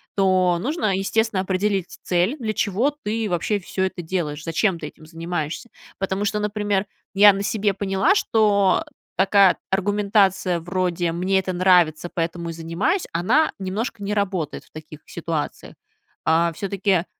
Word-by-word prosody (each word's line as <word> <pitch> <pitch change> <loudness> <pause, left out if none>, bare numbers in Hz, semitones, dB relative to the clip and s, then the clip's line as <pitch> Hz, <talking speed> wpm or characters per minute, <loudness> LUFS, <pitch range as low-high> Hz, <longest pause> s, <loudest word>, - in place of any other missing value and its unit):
то 185 -3 +3
нужно, 240 - 0
естественно, 205 +1 0
определить 190 0 -1
цель. 180 - +1
Для 215 -2 -2
чего 215 +9 +1
ты 220 +1 -1
вообще 180 +4 0
всё 190 +1 -3
это 190 -1 -2
делаешь, 160 -3 -3
зачем 170 +3 0
ты 150 - -5
этим 155 - -14
занимаешься? 165 - -4 0.3
Потому 195 +1 -2
что, 210 +1 0
например, 205 -1 -1 0.3
я 205 0 +8
на 195 - -3
себе 205 -1 0
поняла, 195 - +1
что 210 - +2 0.3
такая 195 0 +4
аргументация 195 -2 +2
вроде: 175 0 -1
"Мне 185 +3 +1
это 185 0 -3
нравится, 175 -3 +3
поэтому 170 0 -3
и - - -4
занимаюсь",- 170 - -1
она 230 - +2
немножко 200 +3 -4
не 205 +1 -2
работает 190 -7 -2
в - - -28
таких 155 -1 -11
ситуациях. 165 -3 -4 0.5
А 165 +1 +3
всё-таки 195 0 0
190 Hz, 145 wpm, -22 LUFS, 175-205 Hz, 0.5 s, я